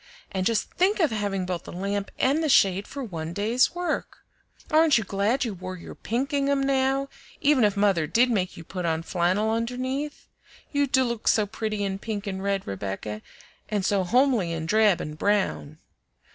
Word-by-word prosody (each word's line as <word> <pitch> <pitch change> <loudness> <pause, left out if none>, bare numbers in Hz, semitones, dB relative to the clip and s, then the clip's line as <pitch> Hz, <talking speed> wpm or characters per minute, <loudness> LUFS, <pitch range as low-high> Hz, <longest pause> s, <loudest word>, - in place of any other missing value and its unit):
And 190 -2 0
just 225 -2 0
think 395 +4 +2
of 320 -8 +3
having 200 -3 -1
both 180 -2 -4
the - - -8
lamp 200 +2 -3
and 285 +5 +2
the 310 - +1
shade 195 -5 +4
for 280 -1 -6
one 165 -7 -5
day's 225 - +2
work! 355 0 -3 0.5
Aren't 310 -3 +5
you 220 - 0
glad 205 +7 0
you 225 - -3
wore 185 0 -7
your 170 - -10
pink 250 +5 -2
gingham 280 -1 +1
now, 270 0 +1 0.3
even 280 -4 +4
if 205 -1 +2
mother 195 -6 +2
did 245 +8 +3
make 185 -5 -1
you 165 - -8
put 180 +2 -5
on 165 -1 0
flannel 185 +5 +1
underneath? 255 +5 -3 0.5
You 285 -1 +2
do 260 0 +3
look 235 -3 -3
so 215 - +4
pretty 215 0 -3
in 195 -1 -2
pink 210 -1 -4
and 190 -1 -4
red, 200 0 -1
Rebecca, 100 +2 -5 0.5
and 205 -3 -1
so 195 -2 +2
homely 235 -3 +2
in 160 -1 -3
drab 210 0 +3
and 150 +1 -7
brown!" 200 -7 0
210 Hz, 185 wpm, -26 LUFS, 185-260 Hz, 0.5 s, Aren't